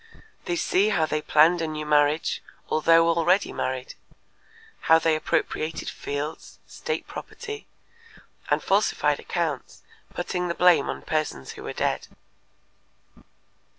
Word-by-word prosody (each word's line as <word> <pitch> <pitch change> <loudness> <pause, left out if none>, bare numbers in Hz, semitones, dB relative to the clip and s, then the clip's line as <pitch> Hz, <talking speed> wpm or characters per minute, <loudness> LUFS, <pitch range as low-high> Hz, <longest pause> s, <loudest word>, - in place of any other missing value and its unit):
They 175 - -1
see 195 +4 +2
how 170 -7 +2
they 155 0 -2
planned 160 +4 +4
a 165 - -1
new 155 -1 -4
marriage 150 +1 +2 0.3
although 165 +1 +4
already 170 +3 +2
married, 130 -1 -3 1.0
how 160 - +9
they 165 -1 +2
appropriated 155 +1 -2
fields, 145 +2 -5
state 465 -1 -4
property, 430 0 -8 0.8
and - - +1
falsified - - +2
accounts, - - -3 0.3
putting 180 -1 -2
the 170 - -2
blame 180 -1 +4
on - - -5
persons 155 - -2
who - - -10
were - - -5
dead. - - -1
160 Hz, 120 wpm, -25 LUFS, 155-175 Hz, 1.0 s, how